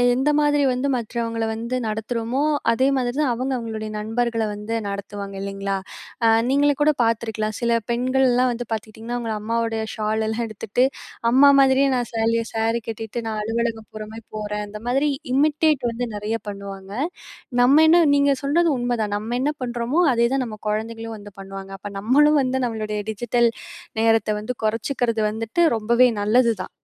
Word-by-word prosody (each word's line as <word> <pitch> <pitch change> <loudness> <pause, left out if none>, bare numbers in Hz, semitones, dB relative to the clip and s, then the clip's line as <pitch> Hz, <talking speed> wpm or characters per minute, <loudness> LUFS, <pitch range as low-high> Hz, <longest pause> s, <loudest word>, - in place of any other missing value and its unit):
எந்த 265 +4 +1
மாதிரி 290 -1 +3
வந்து 255 +3 -1
மற்றவங்கள 230 -1 -3
வந்து 230 +3 -3
நடத்துறோமோ, 230 +4 -2 0.3
அதே 260 +3 +2
மாதிரி 245 -1 -2
தான் 280 -4 +2
அவங்க 255 +3 -2
அவங்களுடைய 220 -2 -5
நண்பர்கள 230 +1 -1
வந்து 210 +2 -5 0.2
நடத்துவாங்க, 200 0 -6
இல்லைங்களா? 195 0 -3 0.5
அ - - +6 0.2
நீங்களே 285 +1 +3
கூட 305 +1 +4
பார்த்திருக்கலாம், 220 -2 -1
சில 235 0 +1 0.2
பெண்கள்ல்லாம் 255 0 +2
வந்து 240 0 -6
பார்த்துகிட்டீங்கன்னா, 220 +2 -5
அவங்க 230 -2 -3
அம்மாவோடய 225 0 -1
ஷாலல்லாம் 220 +2 -1
எடுத்துட்டு, 220 +3 0 0.5
அம்மா 280 +3 +7
மாதிரியே 270 +1 +4
நான் 245 -2 -2
சேலைய 230 0 +1
சேரி 225 +1 +1
கட்டிட்டு, 225 +1 -6
நான் 220 -1 -3
அலுவலகம் 225 0 -2
போற 215 0 -6
மாரி 225 0 -10
போறேன். 210 0 -3
இந்த 210 +1 -8
மாதிரி 270 +4 +2 0.3
இமிடேட் 295 +3 +2 0.3
வந்து 235 +1 -3
நெறைய 210 +2 -2
பண்ணுவாங்க. 200 -1 -7 0.7
நம்ம 270 +5 +6
என்ன 340 +2 +6 0.2
நீங்க 280 0 +4
சொல்றது 330 +5 +3
உண்மைதான். 240 -4 -1
நம்ம 220 +3 -3
என்ன 280 +3 +1
பண்றோமோ, 245 +4 -1
அதே 235 0 +3
தான் 270 -1 +1
நம்ம 215 -2 -7
குழந்தைங்களும் 225 +1 -3
வந்து 205 0 -12
பண்ணுவாங்க. 195 0 -8
அப்ப 205 +1 -7
நம்மளும் 290 +8 +4
வந்து, 260 0 0
நம்மளுடைய 215 -2 -3
டிஜிட்டல் 235 +2 +1 0.5
நேரத்தை 225 -2 +3
வந்து 220 +4 -4
குறைச்சுக்கறது 230 +1 0
வந்துட்டு 225 +9 0
ரொம்பவே 235 +3 +4
நல்லது 230 +3 +4
தான். - - -9
230 Hz, 155 wpm, -22 LUFS, 215-250 Hz, 0.7 s, அம்மா